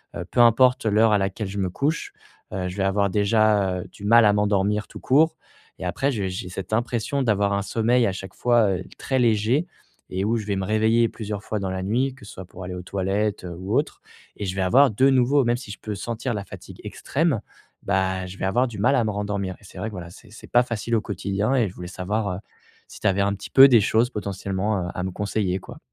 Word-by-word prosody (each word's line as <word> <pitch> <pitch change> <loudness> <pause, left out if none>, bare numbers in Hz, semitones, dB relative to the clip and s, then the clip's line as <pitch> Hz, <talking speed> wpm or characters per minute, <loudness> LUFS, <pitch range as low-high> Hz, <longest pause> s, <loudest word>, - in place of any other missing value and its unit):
heu, 85 - -4
peu 120 - -3
importe 120 +1 +5
l'heure 110 +1 +4
à - - +5
laquelle 95 +2 -2
je 100 +2 -6
me 95 -2 0
couche, 150 - -2 0.4
heu, 95 -1 -2
je 90 - -8
vais 100 - 0
avoir 100 +1 +1
déjà, 100 -2 +2
heu, - - -7
du 100 - -10
mal 115 +2 +6
à 105 - +5
m'endormir 105 0 +1
tout - - -11
court 160 +4 +3 0.4
et 95 - -5
après 135 +10 0
j'ai 100 -7 -2
j'ai 90 0 -5
cette 95 +2 -6
impression 120 +4 -1
d'avoir 100 -4 +1
un 100 - 0
sommeil 115 +3 +2
à - - 0
chaque 95 0 -8
fois, 120 -4 +3
heu, 90 - -7 0.2
très 130 - -1
léger 115 +6 +2 0.5
et 95 +1 -1
où 115 +2 +1
je 110 - -5
vais 100 -1 -1
me 95 - -2
réveiller 110 +3 +2
plusieurs 105 -2 -6
fois 110 - -3
dans 95 -1 -3
la 95 0 -3
nuit, 125 +7 0
que 135 - -15
ce - - -11
soit 95 - -9
pour 90 +1 -11
aller 90 0 -5
aux 90 - -7
toilettes, 100 +2 -2
heu, 85 -1 -6
ou 95 +3 -3
autre - - -2 0.4
et 105 - -4
je 95 -1 -3
vais 95 - -1
avoir 130 +8 +5
de 130 +6 +3
nouveau 135 +2 +3
même 120 +1 +2
si 120 -4 -9
je 105 - -9
peux 105 -1 -5
sentir 115 +3 -3
la 100 -1 -4
fatigue - - -11
extrême, 145 -6 -1 0.4
bah, 95 -1 0
je 95 +1 -10
vais - - -1
avoir 120 +7 +2
du 115 -4 -8
mal 110 +7 +3
à 120 - +3
me 110 - -1
rendormir 100 -2 -3
et - - -22
c'est 95 - -14
vrai 105 - -3
que - - -12
voilà, 90 -3 -7
c'est 110 +3 -16
c'est 110 - -12
pas 120 - +6
facile 115 -1 -4
au 110 - +2
quotidien 100 +4 -1
et 120 -5 +2
je - - -13
voulais 90 - -7
savoir, 100 +4 -2
heu, - - -6 0.5
si - - -12
tu - - 0
avais 100 0 +2
un 100 0 +1
petit 100 - -9
peu 135 0 +9
des 120 -5 +5
choses 110 +4 +2
potentiellement, 100 -2 -2
heu, - - -4
à 90 - -3
me 95 - -2
conseiller 100 -1 -1
quoi. - - -12
105 Hz, 255 wpm, -24 LUFS, 95-115 Hz, 0.5 s, peu